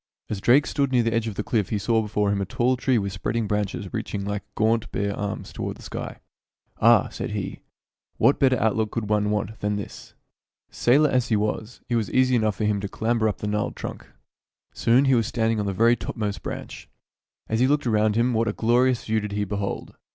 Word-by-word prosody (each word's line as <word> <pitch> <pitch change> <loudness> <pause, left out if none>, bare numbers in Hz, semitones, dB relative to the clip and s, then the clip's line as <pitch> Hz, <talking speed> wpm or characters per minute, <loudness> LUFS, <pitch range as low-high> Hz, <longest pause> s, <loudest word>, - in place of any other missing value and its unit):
As 100 -2 -3
Drake 135 +7 +5
stood 140 -2 0
near 125 -2 +3
the 115 0 0
edge 115 0 0
of 110 - -4
the 105 - -2
cliff 105 -4 0
he 105 - 0
saw 110 +3 +1
before 105 -1 0
him 100 -1 0
a - - -1
tall 120 +6 +1
tree 130 0 +1
with 100 -3 -2
spreading 110 +4 -2
branches 105 -2 -2
reaching 105 -3 -3
like 100 0 -2
gaunt, 110 +1 +1
bare 100 0 -1
arms 100 0 -5
toward - - -4
the - - -14
sky. - - -6 0.3
" - - -36
Ah! - - +5
" - - -22
said - - -5
he, - - -4 0.3
" - - -50
what 135 - +4
better 130 -2 +4
outlook 110 -1 +1
could 115 -2 -3
one 105 -1 +2
want 105 +1 -2
than 105 0 -1
this? 100 - -8 0.3
" - - -69 0.3
Sailor 145 +5 +3
as 125 -1 +1
he 115 - +2
was, 105 +2 -2
it 120 - +1
was 110 -4 -1
easy 130 0 +3
enough 110 -3 +1
for 105 - -2
him 105 -1 +1
to 100 - -3
clamber 110 +1 0
up 105 - -4
the 105 - -4
gnarled 105 0 -1
trunk. - - -7 0.7
Soon 125 +4 +3
he 135 - +4
was 115 -3 +2
stand 115 -2 0
ing 110 - -1
on 105 - -1
the - - 0
very 115 +5 +4
topmost 105 -3 -4
branch. - - -7 0.6
As 110 - -1
he 130 - +4
looked 145 +1 +2
"UPON - - +1
A - - 0
PEAK - - +4
IN 105 - +3
DARIEN" 110 - +3
19 110 +3 +1
around - - +1
him, - - -1
what 115 0 +1
a 105 - 0
glorious 120 +2 +2
view 110 0 +1
did 105 -1 -5
he 105 0 0
behold 100 0 -4
110 Hz, 255 wpm, -24 LUFS, 105-120 Hz, 0.7 s, Drake